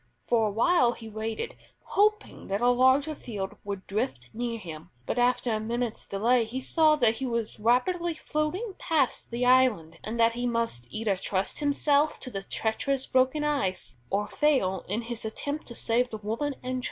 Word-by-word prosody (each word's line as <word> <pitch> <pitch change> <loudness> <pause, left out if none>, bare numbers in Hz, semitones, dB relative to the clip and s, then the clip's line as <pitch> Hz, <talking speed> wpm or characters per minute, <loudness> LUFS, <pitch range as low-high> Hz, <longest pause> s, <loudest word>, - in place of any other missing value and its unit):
For 225 -2 +3
awhile 240 - +3
he 225 - -10
waited, 220 - -4 0.3
hoping 425 +1 +1
that 195 +1 -1
a 245 +2 +4
larger 260 +5 +4
field 205 -9 -5
would 200 -2 -5
drift 200 - -3
near 235 0 -2
him; 165 -7 -9 0.2
but 245 - -1
after 245 -1 +2
a 215 - 0
minute's 235 +1 -3
delay 230 +5 +2
he 230 +4 -4
saw 310 +3 +3
that 230 -6 +2
he 265 - -2
was 230 -3 -3
rapidly 325 - +2
floating 310 +9 -2
past 295 -6 0
the 240 +1 -1
island, 245 -11 +3
and 230 +2 -4
that 230 0 +5
he 245 +1 -2
must 230 - -2
either 215 - 0
trust 190 +1 -2
himself 290 0 +2
to 255 - -7
the 195 - -4
treacherous 255 +7 -1
broken 260 +4 +2
ice, 195 - -1
or 205 +1 0
fail 260 -11 +1
in 215 +5 -1
his 235 0 -6
attempt 285 +7 -4
to 235 - -8
save 240 +3 +1
the 220 - -5
woman 225 +8 -2
and 255 0 -2
child. - - -2
240 Hz, 180 wpm, -28 LUFS, 215-275 Hz, 0.3 s, that